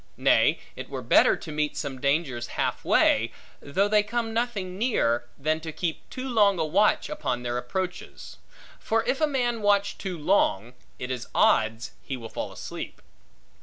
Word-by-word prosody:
Nay, - - +4 0.2
it - - -8
were - - -5
better, - - +5
to 165 - -8
meet 150 0 -1
some 135 -3 -4
dangers 140 -4 0
half - - -1
way, - - +3 0.3
though 190 +8 +1
they 210 0 +4
come 225 +2 -2
nothing 220 -6 -2
near, 120 - +1
than 155 +3 0
to 160 0 -6
keep 165 0 -4
too 260 0 -5
long 205 -6 +4
a 160 - 0
watch 200 +7 +2
upon 125 -4 -3
their 120 0 -1
approaches; 180 +9 -5 0.4
for 225 0 0
if 270 - -1
a 310 - +4
man 245 -5 -1
watch 205 -1 +2
too 185 -3 -4
long, 130 - +1 0.2
it 125 +1 -5
is 125 -2 -4
odds 110 +1 +2
he 135 - -5
will 115 -2 -8
fall - - -5
asleep. - - -7
170 Hz, 170 wpm, -26 LUFS, 130-210 Hz, 0.4 s, better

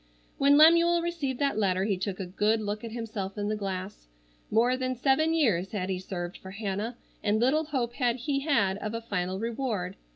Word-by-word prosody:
When 280 +1 +6
Lemuel 335 +2 +6
received 310 -7 -2
that 275 -5 0
letter 190 -2 +1
he 200 -1 +1
took 190 +1 -4
a 190 - -3
good 210 +5 +1
look 210 0 -4
at 230 - -6
himself 220 -4 -5
in 205 0 -1
the 215 - 0
glass. 195 - -5 0.4
More 240 +4 +3
than 255 0 -2
seven 275 +5 +2
years 220 - +1
had 190 -2 -2
he 185 - -2
served 175 -1 -5
for 190 - -10
Hannah, 205 +3 -4 0.2
and 210 +1 +1
little 285 +7 +2
hope 255 -6 -2
had 240 -3 +1
he 275 +3 -1
had 210 -10 +1
of 215 +2 -4
a 230 - -3
final 190 -4 -2
reward. 220 -4 -3
220 Hz, 200 wpm, -28 LUFS, 195-265 Hz, 0.4 s, When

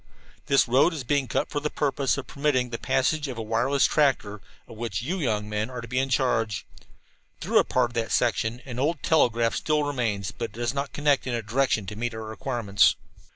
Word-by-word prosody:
"This 140 -2 +4
road 135 +8 +3
is 145 - -4
being 140 +1 0
cut - - -1
for 145 - -1
the 150 +1 -2
purpose 140 -2 0
of 140 - -5
permitting 135 -4 0
the 115 - -4
passage 150 +3 +1
of 130 -3 -6
a - - -3
wireless 125 +5 +2
tractor, 120 -9 +1 0.3
of - - -11
which 110 -3 -3
you 175 +8 -2 0.3
men 105 +2 -3
are 125 -1 -6
to 115 - -7
be 125 +2 -1
in 135 0 0
charge. 115 -5 0 0.7
Through - - +3
a - - +4
part 125 -2 +1
of - - -16
that 115 -2 -2
section 120 0 0
an 125 -2 -6
old 150 +3 0
telegraph 120 -7 +3
line - - -2
still 150 -1 +1
remains, 115 -9 -2
but 115 - -4
it 115 - -8
does 120 +2 -2
not 140 -2 -3
connect 145 -1 +1
in 125 - -1
a 115 - -3
direction 115 -1 +1
to 105 - -6
meet 115 +1 -3
our 110 - -5
requirements. 110 -3 +1
125 Hz, 220 wpm, -26 LUFS, 115-140 Hz, 0.7 s, This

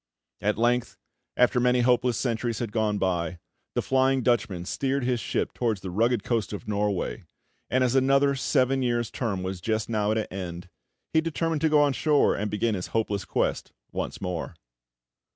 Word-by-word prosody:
At 105 +1 +1
length, 120 +1 +1 0.4
after 125 0 +4
many 125 0 +3
hopeless 125 -1 +2
centuries 115 -2 -1
had 115 -2 -3
gone 105 -2 0
by, 90 -3 -1 0.4
the - - +1
Flying 130 0 +2
Dutchman 105 -7 0
steered 135 +6 -1
his 125 -1 +1
ship - - -2
towards 110 -5 -1
the 95 - -5
rugged 115 +3 +1
coast 115 -4 -1
of 105 +2 -7
Norway; 105 -2 -1 0.4
and 130 0 +2
as 125 -1 +2
another 135 +1 +4
seven 135 0 +1
years' 120 -2 0
term 100 -7 -2
was 95 -1 -4
just 110 +3 -1
now 105 -2 0
at 110 - +1
an 110 - 0
end, 90 -2 -6 0.4
he 160 - +4
determined 165 -1 -1
to 160 - +3
go 150 -1 +5
on 145 -2 +2
shore 150 +1 +3
and 105 +1 -2
begin 110 +2 0
his 90 -3 -3
hopeless 105 -3 -1
quest - - -1 0.2
once - - -4
more. 90 -3 -4
115 Hz, 180 wpm, -26 LUFS, 105-130 Hz, 0.4 s, go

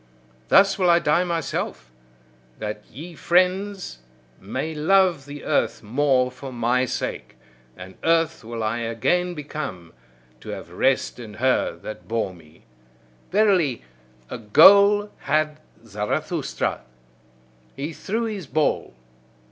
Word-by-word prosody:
Thus 200 +1 +5
will 180 -2 +3
I 170 - +6
die 170 +1 +2
myself, 165 - -3 0.7
that 105 -1 -5
ye 165 +8 -10
friends 185 - 0 0.4
may 130 +11 -4
love 170 -2 +2
the 145 0 -9
earth - - 0
more 130 +2 +1
for 130 +1 -9
my 125 +1 +1
sake; 125 - -5 0.4
and 95 +1 -10
earth 165 -3 +1
will 115 0 -5
I 110 +2 -1
again 175 +11 0
become, 140 - -6 0.5
to - - -11
have - - -7
rest - - 0
in 110 -3 -9
her 130 +3 +1
that 110 - -8
bore 110 -4 -2
me. 80 -2 -19 0.7
Verily, 185 - +2 0.4
a - - -7
goal 200 - +6
had 155 0 0 0.3
Zarathustra; 105 -1 -2 0.9
he 145 +5 -5
threw 220 +8 -3
his 210 -8 -4
ball. 145 - 0
145 Hz, 120 wpm, -23 LUFS, 115-180 Hz, 0.9 s, I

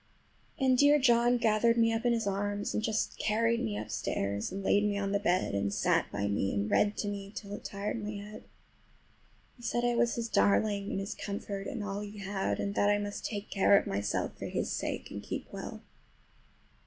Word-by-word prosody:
And 260 -2 +3
dear 290 +1 +7
John 240 -2 +4
gathered 230 0 +3
me 230 -1 +4
up 225 +2 -2
in 240 - +4
his 225 -2 0
arms, 205 +1 -1
and - - 0
just 220 0 -1
carried 230 +2 +1
me 105 -1 -2
upstairs 100 -1 -2
and 195 0 -5
laid 205 +1 +3
me 205 -1 +1
on 200 -1 -1
the 200 - +2
bed, 185 - +1
and 100 0 0
sat - - +1
by 100 0 -1
me 100 -1 0
and 100 +1 -1
read 210 0 +3
to 205 - -2
me 200 -1 -5
till 200 -2 -7
it - - -7
tired 205 +2 -4
my 210 +1 -4
head. 205 +1 -8 1.1
He - - -16
said 240 +1 0
I 240 - +2
was 235 0 +2
his 235 -1 -2
darling 205 -2 +2
and - - -2
his 195 0 -4
comfort 200 -1 -5
and 240 -6 -4
all 200 0 -3
he 210 0 -7
had, 195 -1 -2
and 200 - -1
that 205 - +3
I 205 - +4
must 205 0 -4
take 205 -1 -4
care 200 0 +5
of - - +1
myself 100 +1 -2
for - - -4
his - - -2
sake, - - -3
and - - -5
keep - - -5
well. - - -7
205 Hz, 215 wpm, -31 LUFS, 195-230 Hz, 1.1 s, dear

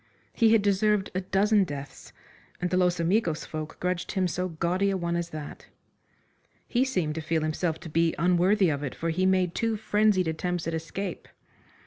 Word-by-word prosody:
He 225 -2 +4
had 225 -2 +4
deserved 205 0 +2
a 185 - -1
dozen 200 +2 +3
deaths, 145 -5 -8 0.5
and 180 0 -2
the - - +2
Los 180 -1 +2
Amigos 170 -2 +1
folk 155 0 -6
grudged 180 -1 -2
him 190 -3 +1
so 180 +2 -2
gaudy 175 +4 0
a 195 - 0
one 170 -1 -2
as 170 0 -2
that. 155 -3 -8 1.0
He 245 +1 +2
seemed 180 - -1
to 160 - -4
feel 160 0 -1
himself 155 +1 -1
to 175 - -8
be 165 +1 +1
unworthy 180 +3 +3
of 145 -2 -1
it, 140 -3 -4
for 165 0 -2
he 185 +3 +1
made 185 -2 +2
two 225 -1 0
frenzied 210 -3 +2
attempts 175 +1 -2
at 165 - -2
escape. 170 +3 -5
180 Hz, 185 wpm, -27 LUFS, 165-195 Hz, 1.0 s, He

